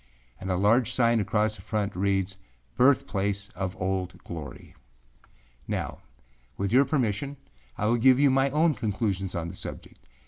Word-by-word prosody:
â -, -, -32 dB
And 95 Hz, -, -5 dB
a 90 Hz, -, +1 dB
large 115 Hz, +6 st, +3 dB
sign 120 Hz, -2 st, +3 dB
across 105 Hz, +1 st, +1 dB
the -, -, -12 dB
front 105 Hz, -4 st, -2 dB
reads, 95 Hz, 0 st, 0 dB, 0.4 s
âBirthplace 100 Hz, -7 st, +2 dB
of 95 Hz, 0 st, -4 dB
Old 95 Hz, -1 st, -2 dB
Glory.â 80 Hz, -4 st, -8 dB, 0.9 s
Now -, -, -3 dB, 0.6 s
with 100 Hz, 0 st, -1 dB
your 130 Hz, +4 st, +5 dB
permission, 135 Hz, 0 st, -1 dB, 0.4 s
I 105 Hz, -, -1 dB
will 115 Hz, +3 st, +3 dB
give 130 Hz, +2 st, +5 dB
my 135 Hz, -1 st, +4 dB
own 155 Hz, +3 st, +3 dB
conclusions 100 Hz, -5 st, -2 dB
on 85 Hz, -1 st, -2 dB
the 90 Hz, -, -7 dB
subject. -, -, -9 dB
105 Hz, 150 wpm, -27 LUFS, 95-125 Hz, 0.9 s, your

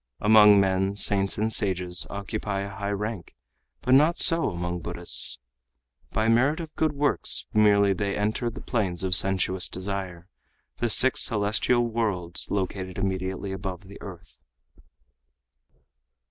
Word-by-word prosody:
Among 105 Hz, -1 st, +6 dB
men, 95 Hz, 0 st, 0 dB
saints 100 Hz, -1 st, +1 dB
and 110 Hz, +2 st, -1 dB
sages 90 Hz, -4 st, 0 dB
occupy 100 Hz, 0 st, -4 dB
a 100 Hz, 0 st, -7 dB
high 100 Hz, 0 st, -4 dB
rank, 105 Hz, -2 st, -5 dB, 0.5 s
but 130 Hz, -, +1 dB
not 155 Hz, +5 st, +4 dB
so 165 Hz, -1 st, +5 dB
among 90 Hz, 0 st, -4 dB
Buddhists. 80 Hz, -, -3 dB, 0.7 s
By 110 Hz, +2 st, -1 dB
merit 130 Hz, +8 st, +2 dB
of 160 Hz, -2 st, -8 dB
good 155 Hz, -1 st, 0 dB
works 145 Hz, 0 st, 0 dB
merely 100 Hz, -2 st, +3 dB
they 100 Hz, +1 st, -3 dB
enter 110 Hz, +3 st, -1 dB
the 115 Hz, -, -10 dB
planes 95 Hz, -7 st, -2 dB
of 95 Hz, -1 st, -1 dB
sensuous 95 Hz, -1 st, +3 dB
desire, 95 Hz, -2 st, -5 dB, 0.5 s
the 120 Hz, -, -1 dB
six 130 Hz, +4 st, +4 dB
celestial 110 Hz, +2 st, +1 dB
worlds 105 Hz, -7 st, -2 dB
located 95 Hz, -1 st, -4 dB
immediately 95 Hz, 0 st, -3 dB
above 95 Hz, -2 st, -6 dB
the 100 Hz, +1 st, -14 dB
earth." 90 Hz, -8 st, -12 dB
100 Hz, 135 wpm, -25 LUFS, 95-110 Hz, 0.7 s, Among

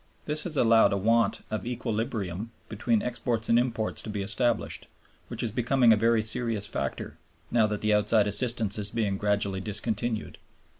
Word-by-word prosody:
This 150 Hz, +1 st, -2 dB
has 160 Hz, -4 st, -2 dB
allowed 115 Hz, -4 st, +5 dB
a -, -, +1 dB
want 115 Hz, +1 st, +2 dB
of 110 Hz, -, -2 dB
equilibrium 110 Hz, -4 st, -3 dB, 0.2 s
between 110 Hz, +1 st, 0 dB
exports 120 Hz, -2 st, -2 dB
and 115 Hz, -, +5 dB
imports 115 Hz, -3 st, -2 dB
to -, -, -8 dB
be 105 Hz, -2 st, -3 dB
established, 120 Hz, +3 st, -1 dB, 0.4 s
which -, -, -4 dB
is 115 Hz, -, -1 dB
becoming 120 Hz, 0 st, +3 dB
a -, -, +5 dB
very 115 Hz, +1 st, +2 dB
serious 110 Hz, -1 st, -1 dB
factor, -, -, -4 dB, 0.3 s
now 115 Hz, -2 st, +3 dB
that 105 Hz, -1 st, -3 dB
the 110 Hz, 0 st, +2 dB
outside 105 Hz, 0 st, +3 dB
assistance 110 Hz, 0 st, +1 dB
is 105 Hz, 0 st, -3 dB
being 105 Hz, -3 st, -1 dB
gradually 100 Hz, -2 st, +1 dB
discontinued. 110 Hz, +2 st, -2 dB
110 Hz, 165 wpm, -27 LUFS, 105-120 Hz, 0.4 s, allowed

